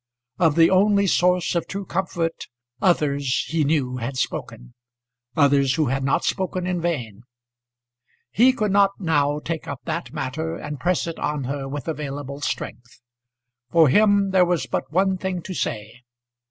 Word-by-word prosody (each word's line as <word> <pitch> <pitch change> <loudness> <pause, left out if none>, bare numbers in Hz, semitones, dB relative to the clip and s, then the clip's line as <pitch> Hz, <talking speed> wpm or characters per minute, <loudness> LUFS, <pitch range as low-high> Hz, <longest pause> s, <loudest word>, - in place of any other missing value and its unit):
Of 160 -4 +3
the 165 +1 +5
only 200 +1 +4
source 180 -1 +2
of 170 - -1
true 195 0 -5
comfort 170 -4 -3 0.3
others, 140 -6 +1
he 160 -1 +1
knew, 140 -4 0
had 125 +2 -4
spoken, - - -4 0.6
others 140 -3 +4
who 155 -5 +1
had 135 +1 -1
not 135 - +1
spoken 185 -1 -1
in 180 -1 -1
vain. 120 -12 -3 1.1
He 240 - +5
could 215 -5 -1
not 200 0 +3
now 145 -5 +1
take 160 +1 -5
up 140 -3 -6
that 120 - -4
matter, 160 +3 -3
and 150 -1 -6
press 180 +3 0
it 165 -1 -6
on 150 -2 -2
her 135 +1 -4
with 145 +2 -6
available 145 -2 -5
strength. 125 -3 -5 0.7
For 160 -1 +5
him 200 +3 +4
there 190 -1 +5
was 175 -2 0
but - - -3
one 190 +2 +1
thing 185 -2 -3
to 185 - -6
say. 110 -6 -4
160 Hz, 160 wpm, -23 LUFS, 140-180 Hz, 1.1 s, the